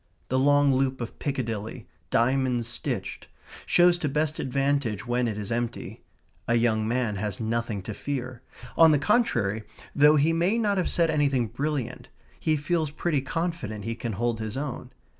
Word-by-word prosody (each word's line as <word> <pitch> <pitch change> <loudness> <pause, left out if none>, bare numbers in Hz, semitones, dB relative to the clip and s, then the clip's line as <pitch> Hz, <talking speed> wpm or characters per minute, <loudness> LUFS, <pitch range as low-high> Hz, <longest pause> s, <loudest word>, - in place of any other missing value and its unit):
The 130 - +2
long 145 0 +4
loop 130 0 0
of 120 -1 -6
Piccadilly, 115 -5 -3 0.2
diamond 125 0 +1
stitched, 120 +1 -3 0.4
shows 175 0 +5
to 150 - -1
best 150 +2 -1
advantage 135 -5 0
when 120 0 0
it 110 -2 -3
is 105 0 -5
empty. 120 0 -3 0.5
A 120 - +2
young 110 -2 +2
man 115 -3 0
has 100 -1 -3
nothing 115 -3 -2
to 110 - -5
fear. 130 -1 -5 0.3
On 165 -1 +7
the 150 - +4
contrary, 115 - +1 0.3
though 150 +1 +6
he 155 +3 +3
may 175 +7 +2
not 205 -4 +1
have 180 - 0
said 165 -2 +2
anything 140 -5 +2
brilliant, 140 -4 -3 0.3
he 155 - +1
feels 155 +1 0
pretty 150 -1 -1
confident 150 - -3
he 115 - -2
can 115 -1 -4
hold 115 +2 -1
his 110 +3 -4
own. 135 -3 -5
130 Hz, 165 wpm, -26 LUFS, 115-150 Hz, 0.5 s, On